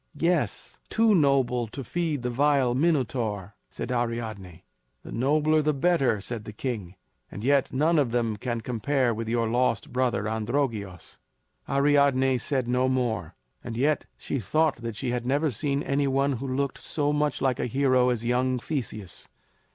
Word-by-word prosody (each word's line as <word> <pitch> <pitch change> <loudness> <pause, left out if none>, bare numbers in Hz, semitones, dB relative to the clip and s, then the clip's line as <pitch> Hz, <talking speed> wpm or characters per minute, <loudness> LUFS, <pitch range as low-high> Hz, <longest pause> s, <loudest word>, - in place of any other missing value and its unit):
"Yes, 170 0 -1
too 225 -1 +4
noble 135 - +2
to 135 +5 -7
feed 155 -1 -2
the 125 - -1
vile 135 -1 +2
Minotaur," 120 - 0 0.2
said 125 - -5
Ariadne. 110 -7 -3 0.4
"The - - -10
nobler, 150 +5 +2
the 150 -1 +1
better," 135 -7 +2
said 110 +2 -5
the - - -6
king; 105 -5 -5 0.3
"and 105 - -8
yet 140 +1 +2
none 155 +4 +2
of 135 -5 +2
them 115 -2 0
can 120 +2 -3
compare 125 +2 0
with 115 0 -4
your 115 0 +1
lost 125 +3 0
brother 125 -4 +1
Androgeos." 110 - -3 0.5
Ariadne 140 -2 +3
said 130 -1 -1
no 125 +1 +2
more; 110 -10 -1 0.3
and 115 -2 -5
yet 145 +4 +1
she 135 - -3
thought 155 +9 +1
that 115 -2 -5
she 125 +2 -3
had 120 -1 -2
never 145 +3 +1
seen 140 +3 -1
any 140 0 +1
one 135 +1 +1
who 135 +4 -5
looked 135 +1 -2
so 145 -1 -1
much 150 0 0
like 130 -2 0
a - - 0
hero 130 0 +3
as 120 -2 -1
young 125 +1 +1
Theseus. 115 - -5
130 Hz, 165 wpm, -26 LUFS, 115-140 Hz, 0.5 s, too